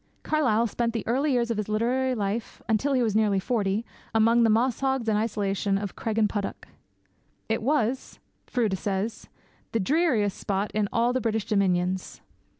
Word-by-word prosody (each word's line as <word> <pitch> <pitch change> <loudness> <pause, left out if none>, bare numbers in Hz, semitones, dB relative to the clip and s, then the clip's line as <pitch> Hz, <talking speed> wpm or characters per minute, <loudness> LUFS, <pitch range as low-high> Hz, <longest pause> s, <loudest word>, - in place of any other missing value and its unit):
Carlyle 245 -8 +2
spent 235 +1 -1
the 225 - -3
early 275 +6 +1
years 240 -2 +1
of 230 - -1
his 215 -1 -3
literary 250 +4 +1
life, 210 +1 -3
until 235 +6 +1
he 255 -2 +3
was 215 -3 0
nearly 210 -2 +3
forty, 210 0 -1 0.3
among 230 +2 +4
the 230 - +4
mosshags 255 +2 +1
and 215 - +2
isolation 200 -2 0
of 200 -1 -5
Craigenputtock. 210 -2 -1 0.8
It 225 +1 0
was, 260 -1 0 0.3
Froude 215 -7 0
says, 200 +3 -3 0.4
the 225 - +2
dreariest 230 - +2
spot 200 +1 -1
in 210 -1 0
all 235 +1 +2
the 255 - 0
British 220 -2 -1
dominions. 185 -2 0
220 Hz, 155 wpm, -26 LUFS, 205-240 Hz, 0.8 s, among